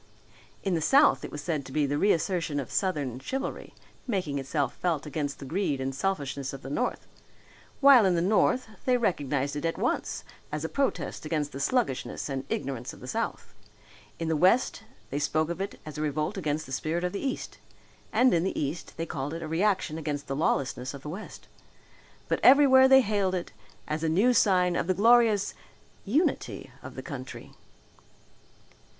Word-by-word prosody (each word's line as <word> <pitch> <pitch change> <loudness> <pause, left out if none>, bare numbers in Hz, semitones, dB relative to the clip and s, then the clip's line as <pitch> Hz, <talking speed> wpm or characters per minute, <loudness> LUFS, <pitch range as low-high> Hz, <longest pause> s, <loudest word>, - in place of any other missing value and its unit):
In 195 - 0
the 165 - 0
south 275 - +5
it - - -6
was 150 - -6
said 155 -5 -1
to 130 - -11
be 150 +1 +1
the 145 +1 -1
reassertion 170 -5 +1
of 135 - -6
southern 145 - -1
chivalry 270 - -5 0.3
making 180 - -1
itself 135 -1 -1
felt 165 -5 -1
against 145 -1 -3
the 140 - -9
greed 155 -2 -1
and 135 0 -2
selfishness 140 -5 -2
of 135 - -8
the 135 - -7
north, 250 +11 -2 0.8
while 275 -4 +8
in 180 - +2
the - - +2
north 215 +7 +2 0.2
they 255 -1 +4
recognized 145 - -1
it 145 - -4
at 165 0 -1
once - - -1 0.3
as 150 +1 -3
a - - -3
protest 280 -1 -2
against 155 -2 -2
the 135 - -7
sluggishness 185 - -1
and 135 -1 -3
ignorance 130 -3 -3
of - - -13
the - - -10
south. - - -3 0.6
In 165 - -3
the 160 - +1
west 185 +10 +3 0.3
they 140 - -1
spoke 155 +2 0
of 170 - -4
it 200 - -5
as 155 0 -7
a - - -2
revolt 155 +5 -1
against 155 -4 -2
the - - -11
spirit 160 +6 -2
of 180 - -1
the 200 - -4
east 270 -2 -4 0.5
and 255 0 +4
in 170 -1 +2
the 190 - -2
east 150 +4 -4
they 165 - -2
called 145 0 -4
it 165 - -5
a - - -4
reaction 165 -1 0
against 145 -2 -3
the 135 - -3
lawlessness 135 -3 -1
of 140 - -11
the 150 - -6
west. 195 +7 -8 0.8
But - - 0
everywhere 265 -1 +7
they 265 0 +7
hailed 200 -4 0
it 180 - -4 0.4
as 155 +1 -2
a 160 - +1
new 205 +10 +4
sign 180 -6 +3
of 175 - -1
the 185 - +2
glorious 225 -1 +4 0.5
unity 285 - 0
of - - -10
the - - -6
country. - - -8
165 Hz, 190 wpm, -28 LUFS, 145-200 Hz, 0.8 s, while